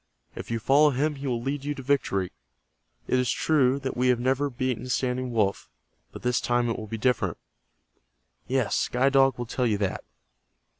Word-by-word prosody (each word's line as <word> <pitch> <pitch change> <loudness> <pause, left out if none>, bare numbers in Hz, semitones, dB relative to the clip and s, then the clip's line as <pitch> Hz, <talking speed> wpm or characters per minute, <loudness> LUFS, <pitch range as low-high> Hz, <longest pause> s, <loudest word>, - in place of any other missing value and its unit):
If - - -8
you 115 - -1
follow 140 +6 +4
him 145 +3 0
he 140 0 -5
will 120 -2 -2
lead 135 +1 -3
you 145 +1 -3
to 135 - -8
victory. 110 -9 0 0.7
It 130 - +1
is 125 -2 0
true 140 -4 +2
that 135 -1 -3
we 125 +1 +1
have 125 -2 +3
never 135 +3 +1
beaten 130 -1 -3
Standing 125 0 -1
Wolf, 105 -4 0 0.4
but - - -10
this 125 0 +1
time 120 -1 +1
it - - -3
will 110 - -7
be 115 - -4
different. 125 +3 0 1.1
Yes, 130 -4 0
Sky 130 +2 +2
Dog 135 -1 +4
will 120 - -4
tell 125 +2 -1
you 105 -2 +1
that. 100 -2 -2
125 Hz, 190 wpm, -26 LUFS, 120-135 Hz, 1.1 s, follow